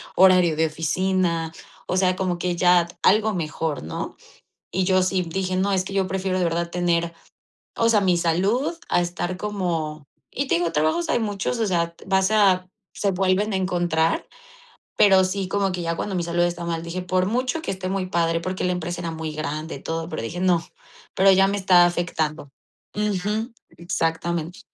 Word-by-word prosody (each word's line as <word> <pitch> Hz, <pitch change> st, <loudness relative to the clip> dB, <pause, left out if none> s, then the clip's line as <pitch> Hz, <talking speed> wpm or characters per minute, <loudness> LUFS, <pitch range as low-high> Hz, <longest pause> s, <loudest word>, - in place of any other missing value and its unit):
horario 180 Hz, -3 st, +5 dB
de 160 Hz, +1 st, +2 dB
oficina, 170 Hz, +1 st, 0 dB, 0.4 s
o 185 Hz, -, -1 dB
sea, 185 Hz, -1 st, +3 dB
como 185 Hz, -2 st, -1 dB
que 175 Hz, 0 st, -1 dB
ya 175 Hz, -1 st, +4 dB, 0.2 s
algo 215 Hz, +2 st, +4 dB
mejor, 160 Hz, -3 st, -3 dB
¿no? 80 Hz, -, -5 dB, 0.6 s
Y 190 Hz, -, 0 dB
yo 185 Hz, 0 st, +3 dB
sí 185 Hz, 0 st, +1 dB
dije: 185 Hz, +2 st, -2 dB
"No, 190 Hz, +2 st, +1 dB
es 185 Hz, -1 st, +1 dB
que 195 Hz, -, -6 dB
yo 195 Hz, -1 st, +1 dB
prefiero 190 Hz, 0 st, -1 dB
de 185 Hz, -, +1 dB
verdad 170 Hz, 0 st, -1 dB
tener, 170 Hz, -1 st, 0 dB, 0.6 s
o 230 Hz, -, +3 dB
sea, 220 Hz, -3 st, +4 dB
mi 180 Hz, -3 st, +3 dB
salud 190 Hz, -, +1 dB, 0.2 s
a -, -, +3 dB
estar 175 Hz, +1 st, -3 dB
como". 170 Hz, -7 st, -3 dB, 0.3 s
Y 275 Hz, +1 st, -2 dB
te -, -, +2 dB
digo, 170 Hz, 0 st, 0 dB
trabajos 160 Hz, +2 st, +1 dB
hay -, -, +2 dB
muchos, 210 Hz, +1 st, -2 dB
o 220 Hz, -, +1 dB
sea, 170 Hz, -2 st, 0 dB
vas 190 Hz, +1 st, +2 dB
a 190 Hz, -4 st, +3 dB, 0.3 s
se 200 Hz, -, 0 dB
vuelven 190 Hz, +3 st, +1 dB
a -, -, +1 dB
encontrar, 175 Hz, -3 st, 0 dB, 0.7 s
pero 190 Hz, -2 st, +6 dB
sí 185 Hz, 0 st, -2 dB
como 195 Hz, -1 st, 0 dB
que 180 Hz, -1 st, -3 dB
ya 165 Hz, 0 st, -2 dB
cuando 200 Hz, -, -3 dB
mi 180 Hz, -, 0 dB
salud 170 Hz, +1 st, 0 dB
está 175 Hz, 0 st, -2 dB
mal, 165 Hz, -1 st, -3 dB
dije: 175 Hz, +2 st, -4 dB
"Por 185 Hz, +1 st, 0 dB
mucho 250 Hz, +7 st, -1 dB
que -, -, -3 dB
esté 185 Hz, -1 st, -5 dB
muy 190 Hz, 0 st, -1 dB
padre". 165 Hz, -2 st, 0 dB
Porque 185 Hz, +2 st, -4 dB
la 180 Hz, -, +1 dB
empresa 175 Hz, -1 st, -4 dB
era 165 Hz, -, -3 dB
muy 160 Hz, -1 st, -5 dB
grande 155 Hz, +1 st, -4 dB
y 135 Hz, -, -12 dB
todo, 165 Hz, 0 st, -3 dB
pero 155 Hz, -, -4 dB
dije: 160 Hz, +10 st, -5 dB
"No". 180 Hz, -2 st, +2 dB, 0.5 s
Pero 195 Hz, +1 st, +5 dB
ya 195 Hz, +1 st, +5 dB
me 200 Hz, -, -1 dB
estaba 185 Hz, -3 st, +5 dB
afectando. 160 Hz, -4 st, -2 dB, 0.4 s
Ujú. 210 Hz, +3 st, -1 dB, 0.2 s
Exactamente. 170 Hz, 0 st, -2 dB
180 Hz, 190 wpm, -23 LUFS, 170-190 Hz, 0.7 s, pero